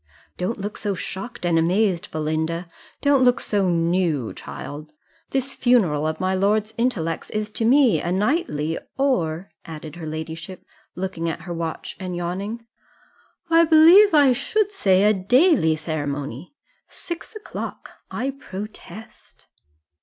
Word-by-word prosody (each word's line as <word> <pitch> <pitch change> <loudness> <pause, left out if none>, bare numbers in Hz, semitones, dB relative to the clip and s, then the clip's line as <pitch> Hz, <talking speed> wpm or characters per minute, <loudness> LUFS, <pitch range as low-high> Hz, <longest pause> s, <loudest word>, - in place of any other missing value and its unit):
Don't 185 +6 -2
look 205 +1 -5
so 205 -2 -1
shocked 195 +4 -6
and 170 -1 +3
amazed, 180 +1 +1
Belinda 160 +2 -2 0.4
don't 285 -2 +4
look 245 -1 +4
so 200 -3 0
new, 165 -6 0
child: 150 +2 -8 0.4
this 270 0 -2
funeral 180 - +2
of 155 0 -3
my 185 0 0
lord's 210 +3 +1
intellects 195 -10 -1
is 215 0 -3
to 225 - -2
me 245 - +4
a 175 - -2
nightly, 185 - 0 0.2
or," 180 - 0
added 155 0 -8
her 165 -2 -6
ladyship, 160 +3 -7 0.3
looking 180 -3 -3
at 165 - -5
her 175 +1 -6
watch 165 -1 -5
and 185 -2 -4
yawning, 195 +7 -4 0.9
"I 330 0 +7
believe 335 +6 +7
I 285 -3 +6
should 410 - 0
say 195 - +3
a 210 +1 +5
daily 215 - +3
ceremony 145 - -4 0.3
six 340 +5 -8
o'clock, 425 - -7 0.2
I 270 +2 -2
protest!" 215 -3 -10
190 Hz, 135 wpm, -23 LUFS, 165-245 Hz, 0.9 s, I